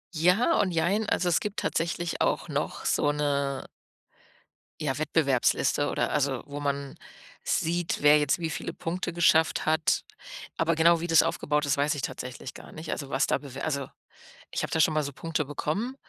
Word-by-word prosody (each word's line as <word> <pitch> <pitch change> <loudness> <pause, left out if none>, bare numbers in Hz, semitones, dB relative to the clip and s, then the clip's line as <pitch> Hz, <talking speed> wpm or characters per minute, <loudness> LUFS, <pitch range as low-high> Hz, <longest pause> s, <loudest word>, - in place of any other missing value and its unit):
Ja 180 - +3
und 200 - +1
jein, 190 +6 +1
also, 180 - +1
es 170 - +3
gibt 210 -1 -4
tatsächlich 170 0 -2
auch - - +1
noch - - -3
so 145 - +2
'ne 140 -2 -1 1.2
ja, 135 -4 -1
Wettbewerbsliste 145 -4 +1
oder - - -1
also, 140 -4 0
wo 145 0 -7
man 140 -1 -3 0.5
sieht, 170 +1 0
wer 145 +1 +7
jetzt 145 +3 +1
wie 165 -1 -2
viele - - -5
Punkte 175 +1 -4
geschafft 160 -2 +3
hat. 155 0 +2 0.5
Aber 165 0 +2
genau 165 +1 +5
wie 170 - -3
das 165 -2 +6
aufgebaut 150 +1 0
ist, 140 -1 +1
weiß 145 +2 +2
ich 145 - -4
tatsächlich 130 0 -6
gar - - -12
nicht. 160 +1 -9
Also, 140 -2 -4
was 135 +1 +1
da - - +2
bewe 135 -1 -9
also, 140 -3 -2 0.6
ich - - -2
habe - - -4
da 160 - 0
schon 155 - +4
mal 155 -1 +1
so 140 - -5
Punkte 160 +1 -2
bekommen 160 - -3
155 Hz, 185 wpm, -27 LUFS, 140-165 Hz, 1.2 s, wer